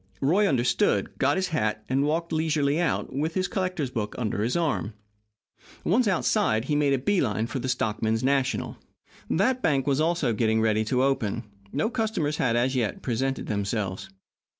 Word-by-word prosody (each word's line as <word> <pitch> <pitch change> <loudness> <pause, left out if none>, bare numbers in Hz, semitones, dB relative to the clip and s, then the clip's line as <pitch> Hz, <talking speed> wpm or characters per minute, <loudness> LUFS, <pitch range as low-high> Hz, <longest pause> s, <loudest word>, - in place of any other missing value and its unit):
Roy 185 +10 +3
understood, 120 - +1
got 140 +2 +3
his 190 0 -1
hat, 110 -9 -1
and 135 +2 +1
walked 165 +3 -1
leisurely 155 -2 +1
out, 165 -5 -1
with 155 +5 -2
his 185 -1 +1
collector's 185 -8 -2
book 105 -4 -3
under 105 -5 -2
his 120 +8 0
arm. 150 -10 -1 0.9
Once 230 +6 +2
outside, 185 - +1
he 150 - 0
made 145 -1 +2
a - - +3
bee 185 +9 +1
line 110 -3 0
for 130 +3 -4
the 130 - -3
Stockmen's 110 -2 0
National. 135 0 0 0.5
That 250 +8 +1
bank 135 - +1
was 140 +1 +1
also 165 -7 +1
getting 110 0 +1
ready 110 -1 +2
to 125 +4 +1
open. 115 -4 0 0.3
No 150 +7 0
customers 215 -11 -1
had, 120 -3 +1
as 125 +3 +1
yet, 115 -5 -1
presented 135 +2 -1
themselves. 100 -2 -2
135 Hz, 175 wpm, -26 LUFS, 115-160 Hz, 0.9 s, Roy